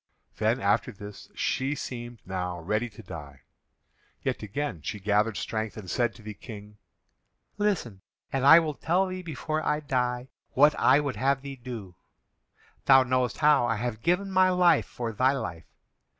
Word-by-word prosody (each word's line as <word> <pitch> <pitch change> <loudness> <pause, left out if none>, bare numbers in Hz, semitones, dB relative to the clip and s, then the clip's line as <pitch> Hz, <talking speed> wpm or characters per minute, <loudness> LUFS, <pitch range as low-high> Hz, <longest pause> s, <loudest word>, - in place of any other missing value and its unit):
'" - - -43
Then, 110 +4 +2
after 105 +5 +1
this, 105 -1 -11
she 135 +3 0
seemed 120 -4 -7
now 90 -1 -3
ready 105 +8 -1
to - - -13
die, 70 -4 -9 0.8
yet - - -1
again 105 - -4
she 105 - -5
gathered 105 +2 +1
strength, 110 -3 -3
and 105 -4 -8
said 120 -2 0
to 110 - -15
the 105 0 -6
King: 105 -1 -11 0.8
"Listen, 160 - -1 0.3
and 135 -1 0
I 150 +4 +10
will 155 -2 -2
tell 175 +6 +1
thee 185 0 -5
before 155 -1 -3
I 150 - +1
die 125 -3 -1 0.2
what 145 +3 +6
I 135 +3 +5
would 145 -6 -2
have 135 +3 +1
thee 140 -1 -6
do. 120 -7 -8 0.9
Thou 135 -1 +7
knowest 130 -1 0
how 150 -5 +4
I 115 - +1
have 115 0 -3
given 180 +7 +1
my 185 0 +5
life 180 -3 +4
for 120 -2 -4
thy 130 +5 +2
life. 85 - -5
125 Hz, 170 wpm, -27 LUFS, 105-145 Hz, 0.9 s, I